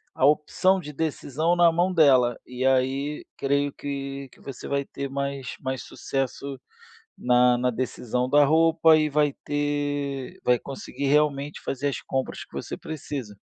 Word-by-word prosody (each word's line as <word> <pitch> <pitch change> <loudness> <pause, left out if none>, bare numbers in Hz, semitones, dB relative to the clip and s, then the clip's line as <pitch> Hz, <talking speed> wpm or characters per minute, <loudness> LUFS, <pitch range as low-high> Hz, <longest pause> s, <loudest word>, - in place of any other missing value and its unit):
a - - +2
opção 155 +6 +3
de 150 -3 -8
decisão 155 +2 -1
na 175 -1 +5
mão 175 +3 +1
dela, 130 -7 +5
e 125 +1 -4
aí, 135 +3 +1
creio 140 +1 +1
que 140 -1 -5
que - - -20
você 135 -3 -8
vai 140 0 0
ter 140 0 -6
mais 140 -2 -4
mais 130 -3 -3
sucesso 135 0 -4 0.6
na 125 0 +4
na 125 +1 +1
decisão 125 0 -2
da 145 +2 +5
roupa 160 +1 +5
e 155 -1 +2
vai 145 -1 +2
ter 145 -2 -2
vai 125 -1 +4
conseguir 140 +1 -6
realmente 145 0 +1
fazer 135 +1 -3
as 140 - -3
compras 130 0 -3
que - - -31
você - - -5
precisa. 135 -8 -6
140 Hz, 155 wpm, -25 LUFS, 130-150 Hz, 0.6 s, na